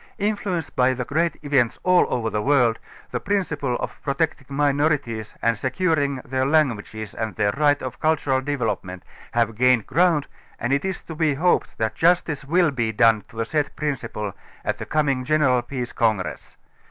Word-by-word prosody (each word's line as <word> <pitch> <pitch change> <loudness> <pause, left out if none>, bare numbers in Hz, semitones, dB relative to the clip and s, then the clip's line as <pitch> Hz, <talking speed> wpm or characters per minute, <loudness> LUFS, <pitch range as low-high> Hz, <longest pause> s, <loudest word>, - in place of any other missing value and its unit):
Influenced 200 -5 -2
by 130 +1 +3
the 125 -1 -3
great 165 +5 0
events 135 -6 +2
all 180 -1 +4
over 115 -2 -1
the 105 - -1
world, 125 -4 +3 0.3
the - - -1
principle 180 -10 -1
of - - -5
protecting 140 -1 -1
minorities 140 -5 0
and 115 0 +3
securing 145 - 0
their 130 0 -1
languages 120 -7 0
and 110 -4 -4
their 100 +3 +2
right 145 +3 +2
of 130 - -6
cultural 145 -4 +1
develope 130 -5 -1
ment 90 -1 -9 0.3
have 115 -1 +1
gained 125 0 +3
ground 170 -3 +2 0.3
and 120 +3 0
it 140 - +1
is 190 -1 -3
to 160 - -8
be 155 -3 +1
hoped 175 +5 +1
that 110 -1 -1
justice 165 -1 +2
will 170 +3 +2
be 115 -4 -1
done 110 -1 +4
to - - -19
the 115 0 -1
said 150 +4 -1
principle 120 -9 -3 0.3
at - - -1
the - - -6
coming 140 -4 +1
general 135 -3 +3
peace 125 0 -5
congress. 110 -6 -1
135 Hz, 175 wpm, -23 LUFS, 115-155 Hz, 0.3 s, all